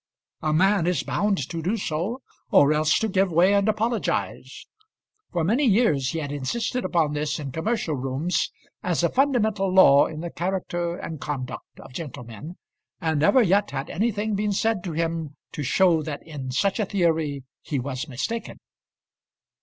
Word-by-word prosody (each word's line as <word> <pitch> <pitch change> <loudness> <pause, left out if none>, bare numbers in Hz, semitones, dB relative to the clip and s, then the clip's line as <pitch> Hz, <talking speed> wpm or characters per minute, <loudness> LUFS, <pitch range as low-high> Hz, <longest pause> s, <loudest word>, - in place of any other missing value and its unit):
A 155 - 0
man 190 +2 +3
is 175 -6 +1
bound 200 -9 0
to 165 -2 -4
do 190 +8 0
so, 190 +8 -3 0.3
or 145 +1 +5
else 155 0 +3
to 220 - 0
give 190 -2 +1
way 175 +5 +4
and 200 +1 +3
apologise. 220 +2 -2 0.7
For 175 -3 0
many 230 - +2
years 195 - +3
he 165 - -3
had 145 -3 -3
insisted 185 - -2
upon 160 -4 +1
this 150 0 -1
in 140 -3 -5
commercial 165 - -1
rooms 135 +7 -1 0.3
as 175 -2 0
a 170 - +3
fundamental 220 -8 +1
law 145 -7 +7
in 155 -1 -7
the 170 0 -5
character 175 -1 -2
and 160 -5 -7
conduct 130 -4 -6
of - - -12
gentlemen, 125 - -8 0.4
and 160 -4 0
never 245 - +5
yet 200 +1 +2
had 140 +2 -5
anything 215 +2 -1
been 205 0 0
said 220 -2 0
to 175 - -3
him 165 -2 -2 0.2
to - - -5
show 165 +4 +3
that 150 -1 -6
in 145 -5 -6
such 195 - 0
a 215 - +1
theory 160 -8 0 0.2
he 145 - -3
was 130 -1 -4
mistaken. 140 - -4
170 Hz, 170 wpm, -24 LUFS, 150-200 Hz, 0.7 s, law